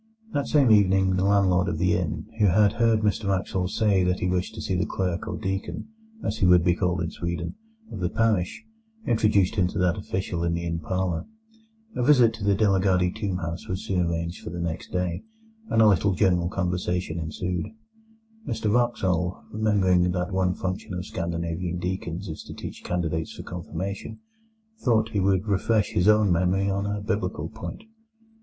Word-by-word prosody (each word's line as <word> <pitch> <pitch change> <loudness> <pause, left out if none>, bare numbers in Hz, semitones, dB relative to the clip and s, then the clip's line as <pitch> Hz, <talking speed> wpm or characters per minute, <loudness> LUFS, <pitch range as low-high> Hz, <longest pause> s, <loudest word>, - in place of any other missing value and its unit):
That 145 -1 0
same 140 -6 +4
evening 95 -2 +4
the 95 - +1
landlord 95 -2 +3
of 85 - -1
the 90 +2 +2
inn, 85 -3 -2
who 105 - +5
had 100 +3 +4
heard 115 -2 +2
Mr 105 -1 0
Wraxall 95 -1 0
say 100 -2 +2
that 90 0 +1
he 90 - 0
wished 90 +4 -1
to 110 - -6
see 95 - -2
the 90 +3 0
clerk 95 +2 -2
or - - -3
deacon 95 - -4 0.3
(as - - -2
he 90 - +4
would 90 -1 +6
be 90 0 +4
called 90 0 0
in 80 - -3
Sweden) 85 0 -4 0.4
of - - -6
the 90 -1 0
parish, 110 - 0 0.4
introduced 105 -3 +2
him 90 -2 +3
to - - -6
that 90 -1 +2
official 95 -3 -3
in 85 0 0
the 85 0 -3
inn 85 -1 -2
parlour. 90 0 -2 0.7
A - - -1
visit 125 -4 +5
to 110 -2 -8
the 100 0 +3
De 105 +1 +3
la 95 -1 +3
Gardie 90 -2 +2
tomb 100 -3 -3
house 85 -1 -5
was 95 +1 -3
soon 95 -2 0
arranged 85 +1 -3
for - - -5
the 85 +2 -6
next 85 -2 -4
day, 90 -2 -1 0.5
and 115 - +4
a - - +7
little 100 -1 +3
general 90 -3 +2
conversation 90 -2 -2
ensued. 90 +2 -3 0.8
Mr 110 -3 -1
Wraxall, 95 -9 0
remembering 95 -5 +2
that 90 +1 -2
one 95 -1 +1
function 95 0 -4
of 90 0 -4
Scandinavian 85 +1 -3
deacons 90 +1 -4
is 80 - -6
to - - -9
teach - - -8
candidates 80 -2 -2
for - - -8
Confirmation, 90 +3 -5 0.6
thought 110 - +2
he 105 -3 -1
would 95 0 +2
refresh 105 +1 +1
his 90 +3 +1
own 105 -2 +5
memory 95 +3 +2
on 100 +1 -1
a 105 0 -2
Biblical 100 -2 -2
point. 110 - -8
95 Hz, 190 wpm, -25 LUFS, 90-105 Hz, 0.8 s, a